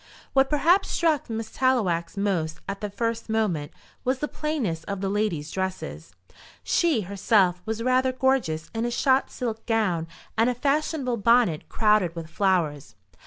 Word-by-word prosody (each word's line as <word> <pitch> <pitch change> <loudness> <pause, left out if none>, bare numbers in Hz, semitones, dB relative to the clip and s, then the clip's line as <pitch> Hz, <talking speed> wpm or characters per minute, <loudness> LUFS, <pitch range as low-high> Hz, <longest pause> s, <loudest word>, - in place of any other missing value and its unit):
What 270 0 +4
perhaps 340 +7 +3
struck 315 -7 +1
Miss 225 -1 -4
Tallowax 200 -11 +1
most 170 -6 -1
at 195 +1 -5
the 210 - -3
first 230 +2 -3
moment 200 -10 0 0.3
was 255 +1 +1
the 295 - -2
plainness 255 - -2
of 200 -1 -4
the 195 0 -1
ladies' 195 -8 -1
dresses. 190 0 -5 0.5
She, 330 -10 +2
herself, 190 -1 +2
was 220 +1 -2
rather 255 +1 +3
gorgeous 255 -12 0
in 225 0 -2
a - - 0
shot 260 +2 +2
silk 225 -3 -4
gown 195 -8 +1 0.3
and 225 +2 +3
a 250 - -1
fashionable 280 -1 0
bonnet 230 -7 +3
crowded 210 -6 +2
with 165 -1 -7
flowers. 165 -7 0
220 Hz, 155 wpm, -25 LUFS, 180-255 Hz, 0.5 s, What